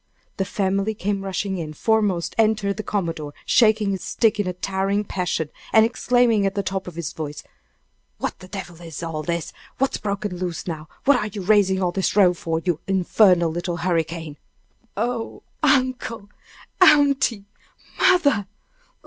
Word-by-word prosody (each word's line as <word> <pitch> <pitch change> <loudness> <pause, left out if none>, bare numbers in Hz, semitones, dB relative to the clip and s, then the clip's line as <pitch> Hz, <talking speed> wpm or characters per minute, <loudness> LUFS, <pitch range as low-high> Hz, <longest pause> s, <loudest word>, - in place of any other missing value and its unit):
The 195 - 0
family 195 +2 -1
came 200 -1 -2
rushing 195 0 -2
in. 155 -2 -5
Foremost 205 -1 +1
entered 215 -2 +2
the - - -2
commodore, 165 -8 -3
shaking 215 -3 +4
his 190 -2 -4
stick 220 -2 +1
in 205 - 0
a 180 - -2
towering 195 +2 -1
passion, 180 -6 -2 0.2
and 220 0 +6
exclaiming 235 -2 +2
at 195 - -3
the 200 - -1
top 190 -1 -3
of 175 - -8
his 170 -1 -4
voice: 150 -2 -6 0.7
"What - - -4
the 185 - -12
devil 175 -4 -8
is 165 -2 -8
all 160 -2 -3
this? 170 +1 -3 0.2
What's 270 +1 0
broke 200 0 -3
loose 180 -3 -4
now? 160 -3 -5 0.2
What 285 -1 +6
are 210 - -2
you 205 -2 -6
raising 190 -1 +3
all 180 - +1
this 190 +1 -1
row 190 -4 +6
for, 165 -1 -3
you 175 -4 0
infernal 185 -2 +3
little 175 +1 -3
hurricane?" 165 -3 -2 0.6
"Oh, 230 +1 -3 0.2
uncle! 255 -6 +1 0.5
aunty! 280 - +4 0.5
mother! 285 - +3
195 Hz, 155 wpm, -23 LUFS, 175-215 Hz, 0.7 s, and